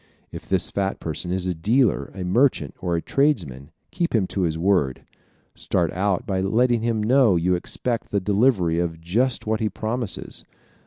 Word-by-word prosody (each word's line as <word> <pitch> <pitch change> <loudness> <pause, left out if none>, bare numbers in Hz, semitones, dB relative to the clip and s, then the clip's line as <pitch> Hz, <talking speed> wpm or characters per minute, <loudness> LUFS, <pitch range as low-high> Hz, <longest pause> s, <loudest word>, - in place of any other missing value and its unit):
If - - -10
this - - 0
fat 100 -1 -2
person 80 +2 -5
is 95 0 -1
a 90 - 0
dealer, 105 - +1
a 95 - -5
merchant 95 - +2
or 90 -2 -1
a 85 - -2
tradesman 85 - 0 0.2
keep 170 -7 -1
him 105 -4 +2
to 100 - -2
his 80 -3 0
word. 85 -7 +1 0.5
Start - - -1
out 100 +4 0
by 95 -4 -1
letting 115 +4 +2
him 115 -2 0
know 120 -3 +4
you 90 +2 +1
expect 115 +6 -2
the 100 - +1
delivery 100 -4 +2
of 85 -2 -2
just 115 +10 0
what 110 0 0
he 110 - 0
promises. 115 0 -4
100 Hz, 175 wpm, -23 LUFS, 85-115 Hz, 0.5 s, know